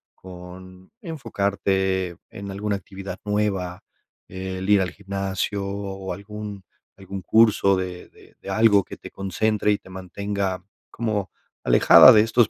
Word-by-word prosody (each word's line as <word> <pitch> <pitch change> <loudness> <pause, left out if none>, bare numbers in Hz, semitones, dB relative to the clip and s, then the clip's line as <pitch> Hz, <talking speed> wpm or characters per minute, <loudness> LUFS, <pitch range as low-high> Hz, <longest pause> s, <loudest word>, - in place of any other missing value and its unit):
con 90 0 -12
enfocarte 100 - -1
en 100 0 -8
alguna 100 +1 -2
actividad 95 -1 -8
nueva, 100 -4 -1 0.5
eh, 95 0 -5
el 95 +2 -4
ir 100 -2 +5
al 90 - -1
gimnasio 100 0 -3
o 100 -1 -5
algún 100 -1 -8 0.3
algún 95 0 -7
curso 105 -1 +4
de 90 -1 -5
de - - -21
de - - -8
algo 105 -3 +4
que - - -10
te - - -11
concentre 105 +3 0
y 100 - +2
te - - -18
mantenga 95 0 -3 0.3
como 110 -4 -2 0.3
alejada - - +8
de 105 - +7
estos 115 0 +3
100 Hz, 140 wpm, -23 LUFS, 95-105 Hz, 0.5 s, alejada